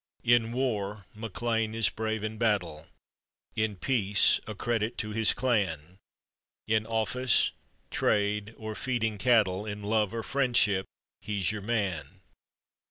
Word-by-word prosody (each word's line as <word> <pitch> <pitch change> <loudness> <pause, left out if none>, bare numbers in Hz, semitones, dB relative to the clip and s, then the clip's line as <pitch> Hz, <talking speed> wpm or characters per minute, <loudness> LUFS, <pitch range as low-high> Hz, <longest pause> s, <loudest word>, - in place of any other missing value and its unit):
In 120 -1 +3
war, 105 -6 -2
MacLean 110 +1 -2
is 115 -3 +3
brave 110 0 -3
in 110 0 -4
battle! 100 -9 0 0.7
In 110 -1 0
peace, 105 -1 +2
a 110 - -5
credit 115 +2 -1
to 105 - -2
his 110 0 +5
clan! 95 - -1 0.7
In 110 0 +1
office, 115 +2 +1 0.4
trade, 105 +1 0
or 110 -1 -5
feeding 115 -3 -1
cattle, 105 -5 +3
In 105 0 -5
love, 105 -1 +1
or 115 - -3
friendship, 115 -5 +2 0.3
he's 100 -3 -1
your 105 -1 -5
man. 100 - -2
110 Hz, 125 wpm, -29 LUFS, 100-115 Hz, 0.7 s, his